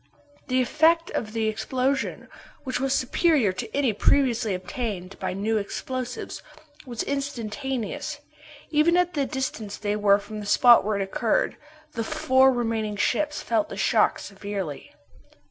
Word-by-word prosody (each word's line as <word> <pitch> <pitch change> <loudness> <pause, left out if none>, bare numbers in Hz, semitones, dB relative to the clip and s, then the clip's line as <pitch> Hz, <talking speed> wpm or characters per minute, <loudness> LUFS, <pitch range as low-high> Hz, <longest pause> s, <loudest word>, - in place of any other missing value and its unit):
The 255 0 +2
effect 330 +5 +3
of 215 - -3
the 225 0 -1
explosion, 260 +5 -1 0.4
which 260 -2 -2
was 270 +1 0
superior 265 - +2
to 185 - -6
any 275 -5 +1
previously 235 -2 +2
obtained 190 -1 -5
by - - -2
new 215 +4 0
explosives, 250 +4 -4 0.5
was 240 -3 -3
instantaneous. 275 +1 -3 0.5
Even 320 +3 +4
at 360 0 +2
the 280 -3 0
distance 230 -6 -4
they 205 -1 -1
were 205 -1 +4
from 210 +1 -8
the 205 - -6
spot 240 +3 +6
where 210 -1 -1
it - - +1
occurred, 210 +3 0 0.4
the 230 -5 -3
four 260 +3 +4
remaining 225 -4 -1
ships 295 +9 0
felt 225 -3 0
the 195 - -7
shock 215 +2 +3
severely. 195 -6 -6
235 Hz, 145 wpm, -25 LUFS, 210-270 Hz, 0.5 s, spot